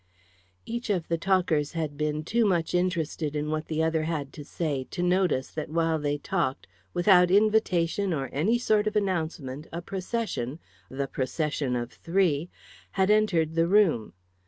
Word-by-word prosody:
Each 235 0 -4
of 180 -5 -1
the 165 - +1
talkers 170 -5 +1
had 155 -3 -3
been 150 +1 -1
too 230 +8 +1
much 175 -6 +1
interested 170 -4 -1
in 150 +1 -2
what 155 0 -2
the 160 0 0
other 160 0 +1
had 150 -4 -3
to 150 - -8
say 145 -3 -3
to 175 - -3
notice 180 -7 +1
that 155 -2 -5
while 165 0 +1
they 145 0 -1
talked, 150 -3 -2 0.3
without 180 0 +5
invitation 200 -2 +2
or 140 -5 -1
any 195 - +2
sort 215 -3 +2
of 215 - -2
announcement, 160 -8 -2
a 170 - -4
procession 185 - -3 0.3
the 135 +1 -2
procession 135 0 -2
of 120 0 -3
three! 170 -3 0 0.4
had 190 +1 +2
entered 180 -7 +2
the 165 0 +2
room. 180 - +3
165 Hz, 160 wpm, -27 LUFS, 150-190 Hz, 0.4 s, without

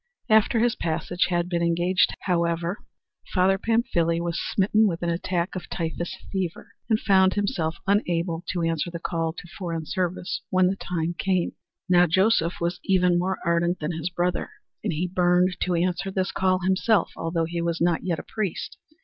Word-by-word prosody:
After 220 +2 +5
his 235 +1 +3
passage 170 +2 -1
had 175 -1 0
been 175 -1 -1
engaged, 175 +2 +2
however, 170 0 0 0.6
Father 190 +1 +3
Pamphile 205 -8 +1
was 170 -1 -2
smitten 210 +2 +2
with 170 -3 -3
an 170 - +1
attack 175 +2 -2
of 180 - -6
typhus 170 +1 -3
fever, 185 -4 -3 0.2
and 220 -1 +3
found 190 -2 +4
himself 175 -6 -1
unable 175 -4 0
to 175 -2 -1
answer 165 0 0
the 170 - -5
call 165 -1 -2
to 175 - -10
foreign 165 -4 -3
service 185 +2 -2
when 185 0 +3
the 185 +2 +2
time 170 -3 -2
came. 185 -3 +1 0.4
Now 180 -1 +5
Joseph 185 0 +2
was 175 +1 -1
even 180 -2 +3
more 190 +2 -1
ardent 170 +1 +2
than 150 +2 -3
his 165 +1 -3
brother, 175 0 -1 0.3
and - - 0
he 165 +3 -1
burned 180 0 +2
to 180 -1 +1
answer 180 +3 0
this 190 0 -1
call 185 -1 +1
himself, 190 +2 +2
although 165 0 -1
he 170 +1 -3
was 170 0 -1
not 170 -1 +1
yet 175 -3 -1
a - - -7
priest. 210 -6 -3
175 Hz, 175 wpm, -25 LUFS, 170-190 Hz, 0.6 s, After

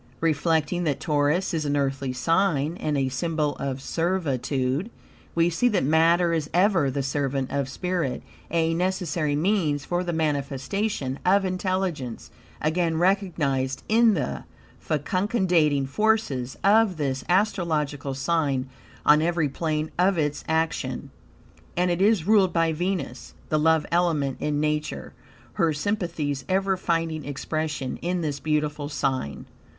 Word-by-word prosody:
Reflecting 165 +1 +1
that 145 -3 0
Taurus 150 +5 +1
is 160 -2 0
an 145 -1 0
Earthy 135 -1 -1
sign, 165 +2 +1
and 150 -2 -1
a 135 -1 +1
symbol 150 +1 -1
of 135 -1 -4
servitude, 150 - -1 0.5
we 165 0 +4
see 210 +9 +2
that 210 -6 +1
matter 165 +4 +3
is 155 -3 -1
ever 180 -6 +3
the 135 +1 -2
servant 135 -1 -1
of 140 -1 -1
spirit, 175 -3 -2 0.3
a 165 0 +1
necessary 175 -4 0
means 155 -4 +1
for 175 +1 -1
the 175 - -2
manifestation 145 +1 -2
of 195 +2 +3
intelligence, 185 - -2 0.3
again 165 +1 +1
recognized 160 -8 0
in 225 -1 +4
the 70 - -3 0.3
fecundating 170 - +1
forces 140 - 0
of 205 -2 +4
this 135 -3 -2
astrological 160 -8 0
sign 135 -2 0 0.4
on 150 +1 +6
every 165 -2 +1
plane 155 +1 -2
of 185 +1 +3
its 150 -2 -1
action. 160 0 -1 0.7
And 180 0 +2
it 175 +1 -1
is 200 -5 +3
ruled 200 -3 +4
by 165 -1 +2
Venus, 170 -6 -3
the 155 - +2
love 160 0 +3
element 165 -6 +1
in 150 -1 -1
Nature, 150 0 -2 0.4
her 170 -6 +2
sympathies 155 -5 -2
ever 195 0 +2
finding 165 -3 -1
expression 145 -1 -3
in 175 +1 -2
this 145 -3 -2
beautiful 150 -1 -1
sign. 135 - -2
160 Hz, 135 wpm, -25 LUFS, 140-180 Hz, 0.7 s, on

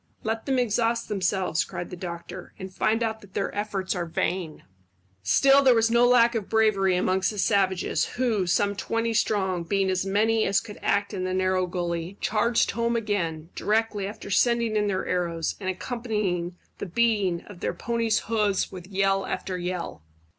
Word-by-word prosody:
"Let 225 +2 -3
them 265 -1 +1
exhaust 235 -1 0
themselves," 190 -4 0
cried 175 -1 -7
the - - -5
doctor, 175 0 -8
"and 190 0 -8
find 225 +4 +1
out 220 -1 -2
that 195 -2 -17
their 200 - -1
efforts 205 -2 -2
are 175 -3 -3
vain." 165 -1 -2 0.6
Still 270 - +5
there 260 -3 +5
was 225 0 +3
no 240 +1 +5
lack 240 -1 +5
of 220 -4 -3
bravery 210 -4 +3
amongst 185 +1 +1
the 210 - -6
savages, 190 -2 +1
who, 225 -7 +1
some 200 +3 +1
twenty 230 +3 -1
strong, 190 -5 +1
being 190 +2 0
as 185 -1 0
many 215 +3 +2
as 195 - +3
could 210 +1 -10
act 200 +1 0
in 185 -2 -3
the 185 0 -1
narrow 185 -1 +1
gully, 175 +1 -3
charged 230 +2 +1
home 235 0 0
again, 170 -8 -2
directly 215 -2 0
after 205 -1 -8
sending 235 +2 +2
in 210 -1 +2
their 190 -2 -1
arrows, 170 -2 -1
and 185 -2 -3
accompanying 200 -5 -2 0.2
the - - -4
beating 200 -3 +1
of 205 -4 -12
their - - -2
ponies' 230 -2 0
hoofs 210 -3 0
with 180 -2 -9
yell 195 0 +1
after 185 - -3
yell. 180 - -4
200 Hz, 175 wpm, -26 LUFS, 185-225 Hz, 0.6 s, Still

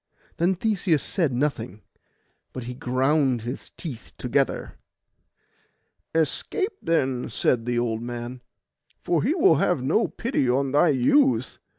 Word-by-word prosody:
Then 180 +3 +2
Theseus 185 -6 +1
said 165 -8 0
nothing; 125 -6 -2 0.7
but 130 - -5
he 125 +1 -6
ground 130 0 +1
his 120 +3 -6
teeth 135 - -9
together. - - -1 1.4
'Escape, 380 - 0
then,' 130 -6 0
said 115 +1 0
the 120 -1 0
old 115 -2 -1
man, 120 +1 -6 0.6
'for 170 -3 +1
he 290 +9 +1
will 380 +2 +5
have 165 -8 +1
no 160 - +2
pity 230 - -1
on 135 +2 +1
thy 150 +4 +4
youth. 265 - +2
135 Hz, 125 wpm, -25 LUFS, 125-175 Hz, 1.4 s, will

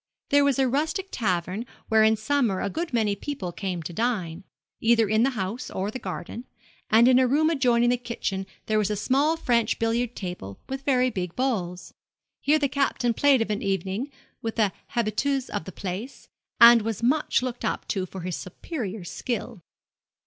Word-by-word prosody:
There 285 0 +5
was 280 -3 +2
a 265 -1 +3
rustic 315 +9 -1
tavern 185 -1 -1 0.2
where 220 -1 +4
in 220 0 +5
summer 220 -3 0
a 200 - -2
good 335 +1 -3
many 220 -4 +1
people 200 -6 -5
came 180 -2 -4
to 170 - -6
dine, 190 -5 -2 0.4
either 225 -1 +4
in 215 +2 +2
the 255 - +4
house 195 +5 -3
or 195 +2 -3
the 255 - -6
garden, 195 +5 -6 0.4
and 230 +2 +6
in 255 0 +6
a 260 - +4
room 310 +5 +3
adjoining 240 -5 +3
the 245 - +2
kitchen 225 -5 -4 0.2
there 215 0 +1
was 210 -1 +1
a 210 - 0
small 275 +9 +2
French 235 -7 +1
billiard 230 +1 0
table 175 - -6
with 270 0 -4
very 255 -2 +3
big 180 -5 -4
balls. 195 -9 -2 0.5
Here 300 +2 +3
the 290 -2 +1
Captain 265 -3 0
played 270 0 +4
of 220 - -5
an 210 - -2
evening 195 - -2 0.3
with 225 -1 -3
the 215 -4 +2 0.2
habitués 245 +4 0
of - - -3
the 190 - -7
place, 195 +9 -6 0.3
and 235 0 +9
was 225 +1 -3
much 265 0 +2
looked 250 -1 -4
up - - -2
to 190 -3 -1
for 190 +1 -8
his 180 -1 -3
superior 210 - -6
skill. 205 +1 -4
230 Hz, 185 wpm, -26 LUFS, 195-260 Hz, 0.5 s, and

